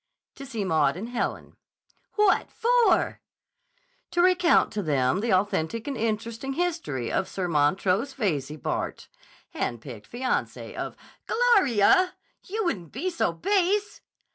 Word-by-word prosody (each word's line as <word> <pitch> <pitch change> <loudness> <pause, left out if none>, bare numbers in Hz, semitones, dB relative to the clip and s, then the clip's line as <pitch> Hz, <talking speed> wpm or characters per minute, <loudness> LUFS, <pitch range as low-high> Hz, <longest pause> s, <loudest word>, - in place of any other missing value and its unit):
"To 275 0 -10
see 220 -5 -3
Maud 165 -1 +2
and 220 +5 -6
Helen." 245 - -4 0.6
"What 420 -3 +3
for?" 480 0 +2 0.9
"To 350 - +1
recount 360 -1 +4
to 210 - -1
them 140 -3 +1
the 225 +2 -1
authentic 195 - 0
and 280 - -2
interesting 230 +3 -2
history 320 - -2
of - - 0
Sir 185 -2 -3
Montrose 185 - +1
Veyze, 155 - -2
Bart., - - -4 0.4
hand 120 - -3
picked 115 -5 -11
fiancé, 255 +2 -2
of—" - - -5 0.3
"Gloria! 370 - +4 0.3
You 430 +2 -2
wouldn't 180 - -2
be 370 +1 -2
so 335 - 0
_base! 405 +1 0
230 Hz, 130 wpm, -26 LUFS, -, 0.9 s, recount